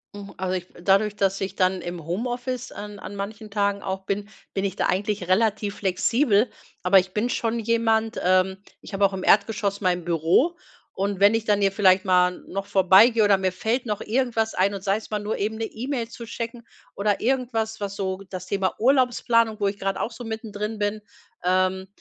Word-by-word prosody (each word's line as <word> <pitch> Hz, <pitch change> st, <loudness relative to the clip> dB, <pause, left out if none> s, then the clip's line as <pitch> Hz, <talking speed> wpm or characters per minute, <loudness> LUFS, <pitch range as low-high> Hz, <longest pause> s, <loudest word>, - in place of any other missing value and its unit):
Hm, 200 Hz, -1 st, -9 dB
also 185 Hz, 0 st, -2 dB
ich 180 Hz, -1 st, -5 dB
dadurch, 200 Hz, +3 st, +3 dB
dass 195 Hz, -1 st, 0 dB
ich 195 Hz, -, -4 dB
dann 185 Hz, -1 st, +1 dB
im 175 Hz, -2 st, -6 dB
Homeoffice 245 Hz, +7 st, -3 dB
an 205 Hz, 0 st, -8 dB
an 200 Hz, -, -8 dB
manchen 210 Hz, +2 st, -6 dB
Tagen 200 Hz, -1 st, 0 dB
auch 190 Hz, 0 st, -4 dB
bin, 200 Hz, +1 st, -2 dB, 0.3 s
bin 195 Hz, -, -1 dB
ich 195 Hz, -1 st, -2 dB
da -, -, 0 dB
eigentlich 200 Hz, -1 st, -1 dB
relativ 205 Hz, +1 st, +1 dB
flexibel. 215 Hz, +4 st, +2 dB, 0.3 s
Aber 185 Hz, +2 st, +6 dB
ich 185 Hz, 0 st, -4 dB
bin 220 Hz, +3 st, 0 dB
schon 230 Hz, -1 st, -1 dB
jemand 225 Hz, 0 st, +1 dB
ähm, 185 Hz, +1 st, +3 dB, 0.2 s
ich -, -, -12 dB
habe 195 Hz, +1 st, +3 dB
auch 195 Hz, -, +1 dB
im 190 Hz, -1 st, -4 dB
Erdgeschoss 200 Hz, -1 st, +2 dB
mein 180 Hz, -3 st, 0 dB
Büro 175 Hz, -, +2 dB, 0.4 s
und 200 Hz, 0 st, -2 dB
wenn 200 Hz, +2 st, +6 dB
ich 225 Hz, -1 st, 0 dB
dann 205 Hz, -2 st, +2 dB
hier 195 Hz, -1 st, +3 dB
vielleicht 190 Hz, -1 st, +4 dB
mal 180 Hz, -1 st, +3 dB
noch 195 Hz, +1 st, -4 dB
vorbeigehe 200 Hz, +4 st, +5 dB
oder 205 Hz, -1 st, +5 dB
mir 190 Hz, -1 st, -1 dB
fällt 225 Hz, +7 st, -1 dB
noch 210 Hz, -2 st, -3 dB
irgendwas 230 Hz, -2 st, 0 dB
ein 195 Hz, +2 st, +2 dB
und 195 Hz, -1 st, -6 dB
sei 195 Hz, +1 st, +1 dB
es 220 Hz, -, -10 dB
mal 210 Hz, -, -1 dB
nur 210 Hz, +1 st, -3 dB
eben 215 Hz, +2 st, -2 dB
'ne 225 Hz, -, -3 dB
E-Mail 235 Hz, +1 st, -4 dB
zu 235 Hz, 0 st, -9 dB
checken 230 Hz, +1 st, -6 dB, 0.3 s
oder 205 Hz, 0 st, 0 dB
irgendwas, 230 Hz, -3 st, -1 dB
was 200 Hz, -1 st, -4 dB
so 190 Hz, -1 st, -3 dB
das 185 Hz, -1 st, -6 dB
Thema 195 Hz, -2 st, -1 dB
Urlaubsplanung, 235 Hz, -3 st, +2 dB
wo 200 Hz, -, +2 dB
ich 200 Hz, +1 st, -3 dB
grad 195 Hz, 0 st, -1 dB
auch 230 Hz, -, -2 dB
so 235 Hz, +1 st, -9 dB
mittendrin 220 Hz, -1 st, -5 dB
bin, 210 Hz, +1 st, -2 dB, 0.4 s
ähm, 185 Hz, +1 st, +1 dB
205 Hz, 200 wpm, -24 LUFS, 190-225 Hz, 0.4 s, Aber